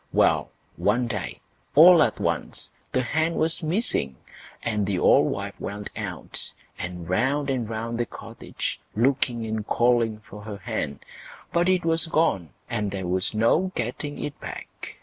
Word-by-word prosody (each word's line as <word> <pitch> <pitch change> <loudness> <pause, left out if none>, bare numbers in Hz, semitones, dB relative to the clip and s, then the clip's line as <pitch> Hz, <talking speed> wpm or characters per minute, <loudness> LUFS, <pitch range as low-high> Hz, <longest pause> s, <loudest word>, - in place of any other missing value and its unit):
Well! - - +3 0.3
one 115 +5 +2
day, 105 -5 -4 0.3
all 170 +2 +9
at - - +2
once, - - -2 0.2
the 130 - +1
hen 160 +5 0
was 160 +1 +2
missing. 160 - 0 0.5
The 105 -4 0
old - - +5
wife - - -4
went 105 0 -5
out, - - -5 0.3
and 90 -2 -5
round 135 +9 +1
and 120 -4 -1
round 115 +1 -3
the 120 - 0
cottage, - - -6 0.2
looking 120 -1 +2
and 110 -1 -2
calling 120 -1 +2
for 105 - -10
her 105 -1 -6
hen, 100 - -3 0.5
but 175 +1 +3
it 185 -2 +2
was 165 0 +2
gone, 125 - +1 0.2
and 105 -1 -1
there 95 -1 -4
was 95 +4 -1
no 155 +12 +3
getting 125 +5 -3
it 145 - -5
back. - - -8
115 Hz, 150 wpm, -25 LUFS, 105-150 Hz, 0.5 s, all